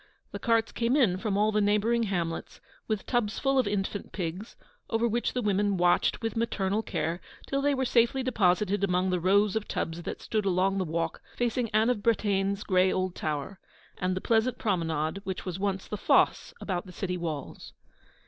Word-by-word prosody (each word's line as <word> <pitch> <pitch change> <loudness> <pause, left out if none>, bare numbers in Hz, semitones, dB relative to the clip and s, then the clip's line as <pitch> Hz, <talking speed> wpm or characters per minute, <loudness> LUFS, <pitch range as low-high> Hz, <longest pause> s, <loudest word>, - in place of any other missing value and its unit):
The - - -6
carts 230 -1 +2
came 235 +3 +1
in 225 -11 +3
from 200 0 -1
all 210 +1 +3
the 210 0 +2
neighbouring 210 +3 +2
hamlets, 170 -4 -3 0.3
with 215 -3 -2
tubs 235 -4 0
full 270 -1 +2
of 255 - +2
infant 205 0 -2
pigs, 180 +4 -5 0.3
over 225 +1 +1
which 235 +1 -1
the 250 - -1
women 205 -1 +1
watched 175 +5 +2
with 225 -2 -2
maternal 210 -3 0
care 170 -4 -3 0.2
till 275 0 -1
they 285 0 +2
were 260 0 0
safely 240 +2 +2
deposited 205 -4 +2
among 185 -1 +1
the 180 - +1
rows 200 +3 +3
of 220 -1 -2
tubs 165 +1 -3
that - - -5
stood 215 -1 -1
along 195 +1 +1
the 185 - 0
walk 165 +1 -2
facing 240 -1 0
Anne 220 +3 +3
of 225 -5 -2
Bretaigne's 200 -3 +1
grey 185 -1 +3
old 185 -1 -1
tower, 155 +5 -4 0.4
and 185 0 0
the 185 - -3
pleasant 230 +2 +2
promenade 165 -3 -1
which 190 -2 -5
was 185 -1 -4
once 195 -1 -2
the 210 - -4
fosse - - +2
about 185 -1 -3
the - - -9
city 180 0 -3
walls. 160 -5 -5
200 Hz, 190 wpm, -28 LUFS, 185-225 Hz, 0.4 s, in